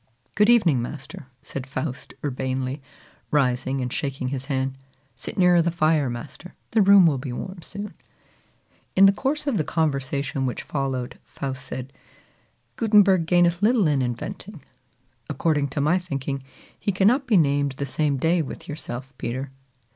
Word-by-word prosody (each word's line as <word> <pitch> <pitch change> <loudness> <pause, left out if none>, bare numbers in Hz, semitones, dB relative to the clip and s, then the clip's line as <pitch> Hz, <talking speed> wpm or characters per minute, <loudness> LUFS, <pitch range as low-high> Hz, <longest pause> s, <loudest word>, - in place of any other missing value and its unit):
"Good 210 +1 +4
evening, 175 - +5
master!" 140 +1 -7 0.2
said 135 -1 -6
Faust 130 -1 -5
urbanely, 130 0 -2 0.5
rising 130 -1 +1
and 125 0 -3
shaking 135 -3 -2
his 135 -1 -4
hand. 135 -1 -1 0.4
"Sit - - -7
nearer 180 -2 +5
the 170 - +1
fire, 155 -4 +2
master; 135 +8 -8 0.2
the 225 - +4
room 200 -2 +7
will 145 -5 +3
be 130 -1 -5
warm 185 +8 -6
soon." 200 +5 -7 1.0
In 195 - +7
the 195 - +8
course 275 +9 -1
of 275 -7 0
the 155 - +1
conversation 140 -3 -1
which 125 - -4
followed, 135 -3 -3
Faust 130 -2 -6
said, 130 +1 -7 0.8
"Gutenberg 200 -6 +4
gaineth 175 0 +3
little 220 -1 +4
in 145 -3 +2
inventing. 160 - -5 0.7
According 150 0 +1
to 140 +1 -3
my 165 +6 +3
thinking, 140 -5 -4 0.4
he 200 - 0
cannot 225 +9 +3
be 220 -5 +4
named 140 -3 +2
the 140 +1 -4
same 145 +1 0
day 165 +5 +2
with 145 - -7
yourself, 135 -3 -6
Peter. 130 +3 -4
145 Hz, 155 wpm, -24 LUFS, 130-180 Hz, 1.0 s, the